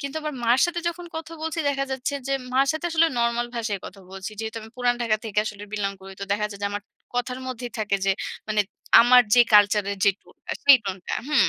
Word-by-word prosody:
কিন্তু 280 +1 -5
আবার 305 -1 -4
মার 235 +2 +4
সাথে 350 0 -3
যখন 345 +1 -6
কথা 320 0 -7
বলছি 320 +1 -3
দেখা 275 -1 0
যাচ্ছে 265 +2 -2
যে 275 - 0 0.2
মার 265 +2 +3
সাথে 315 +2 -3
আসলে 330 0 +4
নরমাল 235 0 +1
ভাষায় 220 -4 -2
কথা 200 - -12
বলছি। 190 +2 -6
যেহেতু 220 0 -5
আমি 220 - -12
পুরাণ 245 -1 +2
ঢাকা 220 -2 +2
থেকে 210 -2 -2
আসলে 205 -1 -6
বিলং 200 -2 -1
করি 195 0 -10
তো - - -2
দেখা 210 +1 0
যায় 200 - -9
যে - - +1
আমার 205 0 -4 0.3
কথার 245 +1 -2
মধ্যেই 245 -2 -6
থাকে 210 -2 0
যে 195 - +3 0.4
মানে 215 -1 +2 0.4
আমার 245 +1 +7
যে 245 - +7
কালচারের 205 -1 +4
যে 200 - +6
টোনটা, - - -13 0.2
সেই 280 -2 +9
টোনটা 190 -2 -4
হুম। 300 -2 +4
235 Hz, 225 wpm, -24 LUFS, 205-275 Hz, 0.4 s, সেই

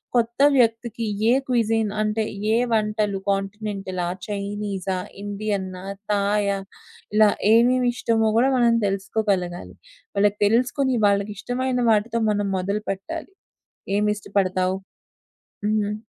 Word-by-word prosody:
కొత్త 235 0 +1 0.2
వ్యక్తికి 230 -1 +1 0.2
ఏ - - +6 0.2
క్విజిన్ 225 -3 +1
అంటే 215 +1 0 0.3
ఏ - - +4 0.2
వంటలు, 210 -2 0
కాంటినెంటలా, 195 -2 -2 0.2
చైనీసా, 200 -2 -3 0.3
ఇండియన్నా, 200 -3 -3 0.3
థాయా, 200 0 +1 0.6
ఇలా 215 0 +6 0.2
ఏమేమి 245 +2 +4
ఇష్టమో 225 -2 +1
గూడా 265 +3 +4
మనం 235 -1 +4
తెలుసుకోగలగాలి. 195 - -2 0.4
వాళ్ళకి 205 +1 +2
తెలుసుకొని 250 +4 +2
వాళ్ళకి 200 +1 +1
ఇష్టమైన 250 +2 -1
వాటితో 225 +2 +1
మనం 205 -1 0
మొదలుపెట్టాలి. 200 - -4 0.7
ఏమిష్టపడతావు 200 -3 0 0.9
హ్మ్. 210 -1 0
210 Hz, 95 wpm, -23 LUFS, 200-230 Hz, 0.9 s, ఏ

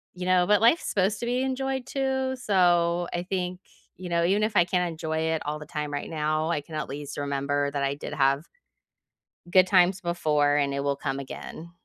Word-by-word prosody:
you 180 0 -5
know, 180 -1 +4
but 210 +2 +3
life's 240 +9 +4
supposed 200 +1 +1
to - - -3
be 245 +2 0
enjoyed, 265 0 -2
too. 265 -1 -1
So, 175 -5 +2
I 175 - -2
think, 180 -1 -3 0.4
you 180 -1 -7
know, 170 0 +1
even 195 +5 +2
if 215 0 -1
I 175 - +6
can't 180 0 0
enjoy 160 -1 -3
it 160 0 0
all 150 +1 -2
the 150 - -9
time 150 -2 -4
right 145 0 -4
now, 155 0 -1
I 150 - 0
can 155 +2 -10
at 150 - -3
least 145 +1 -7
remember 140 0 -1
that 140 -1 -2
I 140 0 0
did 145 - -7
have 140 +1 +2 1.1
good 185 +1 +6
times 185 0 +4
before, 150 -5 +1
and 140 -1 +1
it 140 - -1
will 140 0 0
come 135 -1 -3
again. 160 +4 -8
170 Hz, 215 wpm, -26 LUFS, 145-190 Hz, 1.1 s, I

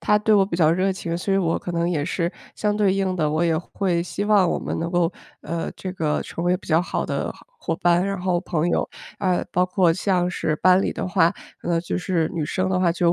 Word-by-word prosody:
她 210 - +3
对 215 0 +3
我 200 -2 +5
比 190 -3 -5
较 160 -3 +4
热 185 +3 +1
情， 170 -3 -4
所 190 +3 -2
以 195 - +3
我 165 -3 +1
可 175 - -6
能 170 0 0
也 155 -5 0
是 170 0 -1 0.2
相 210 -1 0
对 205 -3 +3
应 190 -1 0
的， 155 -3 +1
我 155 +2 0
也 165 -2 +2
会 175 0 -1
希 195 +3 -4
望 205 -4 +4
我 - - 0
们 - - -4
能 170 +1 -2
够， 175 -1 +2 0.3
呃， 165 +2 -4
这 185 - -6
个 155 -4 -1
成 170 - -5
为 180 +1 +3
比 - - -15
较 160 +2 +4
好 - - -2
的 - - -2
好 - - -19
伙 - - -2
伴， 175 +2 +2
然 195 -2 -2
后 180 -1 +1
朋 170 -2 -1
友。 - - 0 0.3
啊， 185 -2 +1
包 180 +1 +2
括 180 -2 +3
像 180 0 +1
是 155 - -1
班 185 +2 +5
里 - - -1
的 - - -4
话， 180 -2 +3 0.3
呃， 170 -1 0
就 175 - -3
是 180 -3 0
女 160 -3 -1
生 185 +5 -1
的 185 - +1
话， 175 -2 +3
就 175 0 0
有 170 - +5
180 Hz, 280 characters per minute, -23 LUFS, 170-190 Hz, 0.3 s, 我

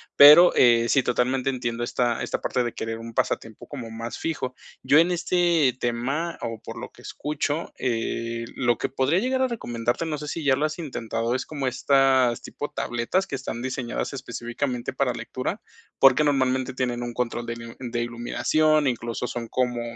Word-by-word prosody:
Pero, 150 +5 +10
eh, 120 -1 +5
sí, 135 -3 +4
totalmente 125 +2 +1
entiendo 120 -2 -3
esta 120 0 0
esta - - -3
parte 125 - 0
de 120 - -3
querer 115 0 -4
un 115 0 -9
pasatiempo 110 -1 -2
como 120 -6 -7
más 115 +1 -6
fijo. 130 -6 -3 0.3
Yo, 145 - +5
en 175 +2 +4
este 170 -6 +2
tema, 135 +8 -2
o 115 -1 -4
por - - -7
lo - - -7
que - - -18
escucho, 150 +2 -3
eh, 115 -1 -2
lo 120 -3 +1
que - - -1
podría 135 +6 +1
llegar 260 +4 0
a 260 - +3
recomendarte, 120 - -2
no 155 -2 -2
sé 150 - -7
si 165 - -4
ya 135 -1 +5
lo 150 - 0
has 155 +2 -3
intentado, 115 -5 -2
es 130 - -2
como 140 -4 -3
estas 130 -2 +3
tipo 145 - -6
tabletas 120 +11 -1
que 140 - -3
están 130 -3 -5
diseñadas 130 0 -3
específicamente 120 0 -4
para - - +1
lectura, - - -4 0.4
porque 135 +2 +6
normalmente 130 -2 +1
tienen 125 -2 -2
un 120 0 -5
control 120 -1 -2
de 115 - -4
miu 115 0 -9
de 120 -2 -3
iluminación, 145 +6 +1
incluso 120 0 -2
son 120 -1 -5
como 125 -2 0
125 Hz, 185 wpm, -25 LUFS, 120-145 Hz, 0.4 s, Pero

